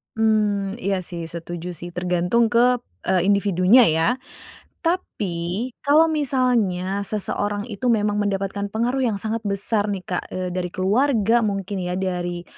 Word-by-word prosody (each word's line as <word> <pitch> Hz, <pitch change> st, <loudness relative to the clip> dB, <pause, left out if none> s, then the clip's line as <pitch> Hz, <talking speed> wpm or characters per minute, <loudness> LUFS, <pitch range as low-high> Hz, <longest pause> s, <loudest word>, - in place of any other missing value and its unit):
Mmm, 210 Hz, -3 st, +1 dB
iya 200 Hz, -5 st, -1 dB
sih, 175 Hz, -1 st, -6 dB
setuju 170 Hz, +1 st, -6 dB
sih 175 Hz, 0 st, -7 dB
tergantung 180 Hz, +6 st, +1 dB
ke, 245 Hz, +1 st, +4 dB, 0.3 s
eee 185 Hz, -2 st, +3 dB
individunya 200 Hz, +4 st, +5 dB
ya. 160 Hz, +1 st, +2 dB, 0.8 s
Tapi, 205 Hz, -, -2 dB
kalau 300 Hz, +3 st, +5 dB
misalnya 245 Hz, -, 0 dB
seseorang 205 Hz, 0 st, -2 dB
itu 240 Hz, +1 st, -2 dB
memang 210 Hz, -2 st, +2 dB
mendapatkan 200 Hz, 0 st, -2 dB
pengaruh 240 Hz, +5 st, 0 dB
yang 225 Hz, -6 st, +1 dB
sangat 220 Hz, +2 st, -3 dB
besar 205 Hz, +1 st, 0 dB
nih 195 Hz, -3 st, -3 dB
Kak, 180 Hz, -, -3 dB
eee, 185 Hz, -1 st, -3 dB
dari 180 Hz, -1 st, -2 dB
keluarga 225 Hz, +4 st, +2 dB
mungkin 200 Hz, -2 st, -2 dB
ya 180 Hz, 0 st, -2 dB
dari, 175 Hz, -2 st, -2 dB
200 Hz, 140 wpm, -22 LUFS, 180-230 Hz, 0.8 s, individunya